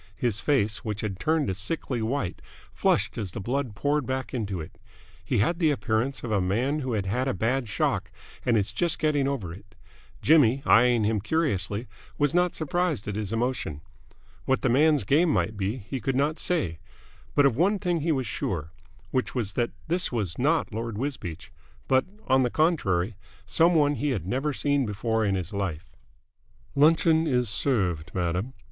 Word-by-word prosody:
His 115 -4 -1
face, 110 -7 +1
which 105 -3 -3
had 100 -4 -4
turned 155 - +1
a 95 - 0
sickly 120 - -3
white, 110 -4 -2 0.3
flushed - - +1
as 100 -5 -4
the - - -4
blood 120 +2 -2
poured 145 +4 0
back 130 0 -3
into 100 -7 -2
it. 80 - -9 0.4
He - - 0
had 165 - +1
the 160 -3 +4
appearance 130 -1 -1
of 120 - -4
a 100 -2 +2
man 120 +11 0
who 130 -4 -2
had 100 -3 -1
had 125 +7 -1
a 130 - 0
bad 120 +1 0
shock - - 0 0.3
and 120 -2 +3
is 100 -1 0
just 170 +8 +1
getting 145 -3 +1
over 110 -12 -3
it. 95 - -15 0.4
Jimmy, 140 -4 +4
eyeing 120 -1 +5
him 105 -1 +1
curiously, 110 - -1 0.3
was 145 +1 +2
not 180 0 +2
surprised 160 - -1
at 105 - -3
his 105 -2 -3
emotion. 115 - -2 0.6
What 135 -1 +1
the 130 - +3
man's 145 +2 +4
game 150 - +3
might 110 -7 +1
be, 100 +4 -2
he 125 +4 -5
could 135 +4 -1
not 145 +4 +1
say; 95 - -1 0.6
but 145 - +5
of 135 -5 +3
one 190 - +3
thing 175 -3 -1
he 165 +2 +1
was 135 -4 0
sure, 85 -7 -3 0.4
which 130 0 -1
was 110 -6 -2
that 120 -1 0 0.2
this 175 +2 +1
was 105 -8 -2
not 150 -2 +1
Lord 115 -1 -4
Wisbeach, 115 - -5 0.4
but 130 0 +3 0.2
on 130 0 +4
the 125 - +2
contrary 115 - +1 0.3
some 165 +10 +3
one 145 -2 +4
he 145 +1 -1
had 105 - -2
never 135 +9 -1
seen 145 0 +1
before 110 +1 -1
in 100 -2 +1
his 90 +1 -4
life. 95 -6 -3 0.8
"Luncheon 160 +2 +4
is 125 -5 +1
served, 95 - -1
madam!" 90 +7 -1
125 Hz, 185 wpm, -26 LUFS, 100-145 Hz, 0.8 s, eyeing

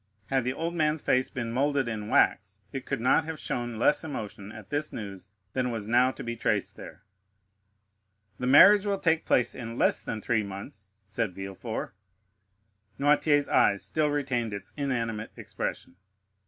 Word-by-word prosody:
Had 135 -2 +1
the 125 - 0
old 165 +4 -3
man's 155 -2 0
face 130 0 +2
been 120 -3 -4
moulded 135 +1 +1
in 110 -2 -4
wax 100 -1 +2
it 135 - -6
could 135 - -2
not 125 +6 +3
have 160 -1 -6
shown 120 -2 -3
less 115 - +3
emotion 105 -9 -6
at 110 -3 -12
this 150 +1 -1
news 100 -2 -7 0.2
than 130 -1 0
was 110 -3 -4
now 125 +3 +4
to - - -7
be 120 0 -4
traced - - -1
there. 80 +5 -11 1.4
"The 125 - -2
marriage 200 +10 +8
will 200 -1 +1
take 165 -3 +1
place 125 - +2
in 115 -1 -7
less - - +2
than 110 - -4
three 110 0 +1
months," 100 0 -9 0.2
said 100 -1 -3
Villefort. 95 +3 -5 1.1
Noirtier's 145 0 +3
eye - - +4
still 150 +9 -1
retained 130 -6 -1
its 100 -1 -9
inanimate 115 -6 -2
expression. 85 - -5
120 Hz, 165 wpm, -28 LUFS, 105-145 Hz, 1.4 s, marriage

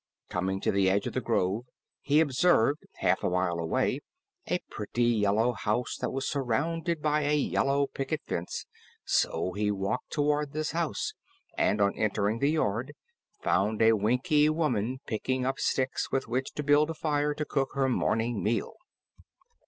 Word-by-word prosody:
Coming 95 +1 -1
to - - +1
the 95 -1 +3
edge 100 +2 +1
of - - -3
the - - -1
grove, 100 +6 0 0.4
he 150 +2 +3
observed 145 -1 +2
half - - +1
a - - +2
mile 90 -1 0
away 130 +11 0 0.5
a 180 - +1
pretty 110 +3 -2
yellow 110 0 +3
house 110 +2 -1
that - - -2
was 135 0 -3
surrounded 155 +5 -1
by 150 0 +2
a 145 +1 +2
yellow 140 -1 +1
picket 140 +3 -4
fence, 85 +1 -4 0.4
so 90 - +1
he 105 +2 -1
walked 95 -1 -2
toward 150 -1 0
this 155 0 -2
house 170 - -2 0.4
and 105 - +2
on 100 0 +2
entering 105 +1 0
the 140 - +2
yard 135 -2 -1 0.5
found 105 +2 +1
a 115 0 +6
Winkie 125 - +3
woman 130 -6 0
picking 125 +3 -1
up 135 +1 -1
sticks 130 0 0
with 135 - 0
which 130 +3 -2
to 150 - -3
build 145 +2 +4
a 165 - -3
fire 150 -1 0
to 150 - -3
cook 135 -2 -1
her 135 -1 +2
morning 115 -3 0
meal. 115 +2 -1
130 Hz, 165 wpm, -29 LUFS, 105-150 Hz, 0.5 s, a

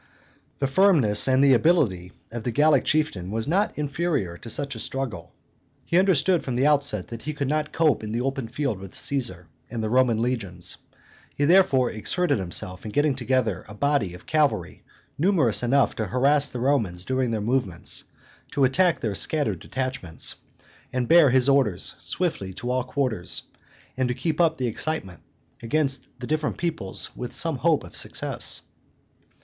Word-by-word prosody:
The 140 - -1
firmness 135 - +3
and 130 +1 +4
the 140 -1 +6
ability 115 - +2 0.2
of 120 0 -5
the 120 - -2
Gallic 145 +2 +3
chieftain 150 - 0
were 110 +2 -2
not 190 +8 0
inferior 145 - -1
to 115 - -10
such 140 +4 -2
a 115 - -7
struggle. 120 -9 -5 0.5
He 170 - +3
understood 185 -1 +3
from 130 - -3
the 130 +3 +2
outset 140 -10 +1
that 115 -1 -7
he 155 0 -5
could 140 -2 -2
not 150 +1 -1
cope 155 -8 +2
in 105 - -5
the 115 +2 -1
open 135 -2 -2
field 120 -3 -2
with 95 -1 -10
Caesar 115 -11 0 0.2
and 115 -2 -4
the 110 - -2
Roman 125 -3 +3
legions; 110 -8 -1 0.6
he 145 - +1
therefore 160 -7 +4
exerted 140 - 0
himself 90 0 -3
in 110 - -6
getting 145 +4 +2
together 125 -6 -1
a 105 - -10
body 130 -9 0
of 90 - -14
cavalry 155 -2 0 0.4
numerous 155 - +3
enough 130 +2 +2
to 110 - -2
harass 140 +6 +4
the 125 - -6
Romans 110 -10 0
during 130 -1 0
their 110 -1 -1
movements, 105 -5 -1 0.5
to 140 - +1
attack 170 +7 +3
their 110 -3 -1
scattered 110 - +2
detachments, 130 -10 -3 0.6
to 125 - -1
bear 160 +3 +6
his 130 +1 +4
orders 135 -10 +2
swiftly 95 -1 -3
to 125 +4 -4
all 130 0 0
quarters, 130 -8 -2 0.5
and 130 -1 0
to 125 - -1
keep 160 +3 -1
up 160 -1 +2
the 130 - -2
excitement 115 - -3 0.4
amongst 135 +3 0
the 125 - -5
different 155 +2 -1
peoplets 160 - -3
with - - -6
some - - +2
hope - - +2
of - - -12
success. - - -2
130 Hz, 170 wpm, -24 LUFS, 110-150 Hz, 0.6 s, the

